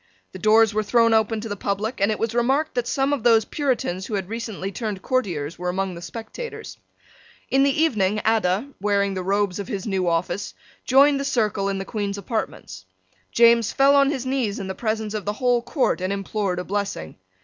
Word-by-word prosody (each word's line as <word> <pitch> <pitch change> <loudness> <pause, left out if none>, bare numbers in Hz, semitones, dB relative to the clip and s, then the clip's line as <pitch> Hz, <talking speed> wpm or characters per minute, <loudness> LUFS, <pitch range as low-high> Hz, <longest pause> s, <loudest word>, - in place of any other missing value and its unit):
The - - -9
doors 220 0 +4
were 215 - +1
thrown 230 +2 +3
open 220 0 +2
to 225 - -5
the 205 - -4
public; 205 +3 -3
and 200 - +3
it 215 - -1
was 225 0 -2
remarked 265 +6 +1
that 245 -1 -1
some 275 +1 +1
of 280 - -1
those 225 -1 +4
Puritans 240 - -2
who 215 - -3
had 190 -1 -3
recently 220 -4 -4
turned 205 -3 -4
courtiers 175 - -2
were 180 0 -2
among 190 +1 -2
the 170 - -9
spectators. 230 - -8 0.7
In 270 - +4
the 280 +2 +2
evening 215 -9 +1
Adda, 220 +2 +1
wearing 200 -1 +1
the 185 - -3
robes 200 0 0
of 200 - -5
his 200 -6 -4
new 190 -4 -1
office, 170 +4 -1 0.3
joined 275 +2 +5
the - - -2
circle 215 -6 0
in 195 - -2
the 195 - -4
Queen's 205 -1 -3
apartments. 185 - -5 0.5
James 235 -2 +5
fell 275 +1 +4
on 275 -1 +5
his 265 -4 -3
knees 255 -6 -1
in 195 - -5
the 190 - -4
presence 220 0 -2
of 215 -2 -4
the 205 - -1
whole 245 +1 +1
court 255 - 0
and 185 +1 -1
implored 200 -1 -2
a 180 - -2
blessing. 200 - -4
215 Hz, 205 wpm, -23 LUFS, 195-240 Hz, 0.7 s, joined